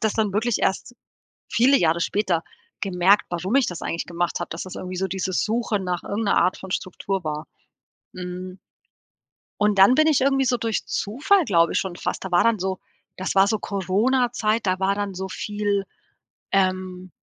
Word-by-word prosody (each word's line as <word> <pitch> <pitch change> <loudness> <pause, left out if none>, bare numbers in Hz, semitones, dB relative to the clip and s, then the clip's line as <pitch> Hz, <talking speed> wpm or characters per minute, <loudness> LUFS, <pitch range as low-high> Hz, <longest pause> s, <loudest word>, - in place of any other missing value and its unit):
das 220 -2 +1
dann 215 -3 0
wirklich 225 +2 +1
erst 220 +5 -1 0.6
viele 260 +4 +4
Jahre 170 -3 +2
später 185 -3 0 0.4
gemerkt, 190 +1 +3
warum 180 +7 -2
ich 275 - +4
das 175 - -5
eigentlich 165 - -3
gemacht 175 0 -2
habe, - - -4
dass 165 - -4
das 185 - -9
irgendwie 185 0 -6
so 190 +1 -1
dieses 190 0 -1
Suchen 220 -3 -1
nach 180 -1 -2
irgend 215 +2 -3
'ner 200 - +2
Art 180 +2 +2
von 190 -1 -10
Struktur 190 +1 -3
war. 155 0 -4 0.7
Mhm. 185 +1 -7 1.0
Und 210 -1 +2
dann 195 +6 +7
bin 310 +2 +4
ich 300 -5 +3
irgendwie 270 0 +2
so 245 -1 +2
durch 225 -2 -2
Zufall, 295 - +1
glaube 170 -6 +3
ich, - - +2
schon 185 -2 -3
fast - - -4
da 190 - -5
war 175 - +4
dann 230 -2 +3
so 190 0 -2 0.4
das 185 +1 -3
war 195 +1 +6
so 215 0 0
Coronazeit, 215 +3 0
da 185 0 0
war 195 +1 +2
dann 205 -1 -3
so 190 +1 -4
viel 205 0 -2 0.7
ähm, 185 -1 -1
195 Hz, 190 wpm, -23 LUFS, 185-220 Hz, 1.0 s, dann